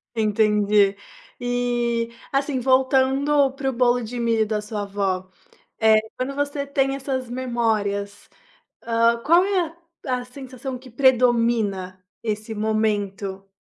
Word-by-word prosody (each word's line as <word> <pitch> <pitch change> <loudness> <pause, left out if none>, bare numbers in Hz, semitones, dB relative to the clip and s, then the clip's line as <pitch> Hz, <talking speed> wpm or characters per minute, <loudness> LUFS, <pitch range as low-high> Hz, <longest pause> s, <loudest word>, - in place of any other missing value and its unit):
Entendi. 210 -2 +3 0.4
E, 240 -1 -1 0.2
assim 275 -1 0
voltando 265 +2 +3
para 270 0 -2
o 265 - -3
bolo 245 0 +2
de 240 +2 -5
milho 230 -2 +2
da 210 -1 -1
sua 210 -1 -4
avó, 195 -2 -2 0.5
eh, 220 -1 +5 0.2
quando 265 +2 -3
você 285 0 -2
tem 275 -1 0
essas 260 -3 -4
memórias, 220 -5 -2 0.5
hã, 230 0 +2
qual 345 +3 +5
é 395 -2 +1
a 330 - -19 0.3
a 250 -1 -1
sensação 255 0 -8
que 260 0 -14
predomina 230 -7 +2 0.2
esse 215 0 -3
momento? 205 -2 -2
235 Hz, 125 wpm, -23 LUFS, 210-260 Hz, 0.5 s, eh